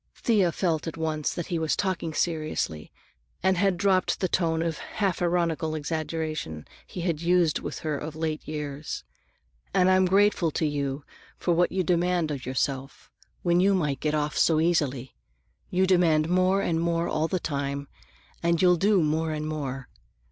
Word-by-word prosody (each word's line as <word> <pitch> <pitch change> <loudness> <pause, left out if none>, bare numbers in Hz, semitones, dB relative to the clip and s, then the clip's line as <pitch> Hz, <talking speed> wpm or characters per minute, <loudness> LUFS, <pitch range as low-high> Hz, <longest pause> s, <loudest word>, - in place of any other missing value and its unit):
Thea 200 -7 +2
felt 165 -3 -1
at 165 - -5
once 155 -2 -1
that 170 - -4
he 170 -3 -2
was 160 -1 +1
talking 185 -4 -1
seriously 155 - -2 0.5
and 190 0 +3
had 190 0 +2
dropped 185 0 +2
the 185 - +1
tone 165 -2 +1
of 165 -2 -2
half 195 -5 -2
ironical 170 -2 0
exaggeration 155 - -3 0.2
he 180 - -6
had 170 -3 -1
used 170 -2 +3
with - - -6
her 150 -3 -2
of 155 +1 -6
late 160 -1 -3
years. 150 - -5 0.7
"And 185 -1 +5
I'm 185 0 +4
grateful 195 -2 +3
to 160 - 0
you 140 -1 -2 0.3
for 175 - +1
what 175 +1 +2
you 185 0 0
demand 175 -1 +1
from 145 -2 -3
yourself, 135 +1 -3 0.3
when 175 0 +3
you 195 +2 +4
might 150 -7 0
get 155 0 0
off 150 0 -1
so 160 -2 +3
easily. 140 -7 0 0.6
You 185 +1 +2
demand 170 -4 +3
more 185 +2 +3
and 165 -3 0
more 170 0 0
all 155 +1 0
the 185 +1 -1
time, 140 -2 -3 0.5
and 170 0 +2
you'll 180 0 +5
do 195 0 +3
more 160 +1 0
and 155 0 -3
more. 135 -4 -4
165 Hz, 170 wpm, -26 LUFS, 150-180 Hz, 0.7 s, And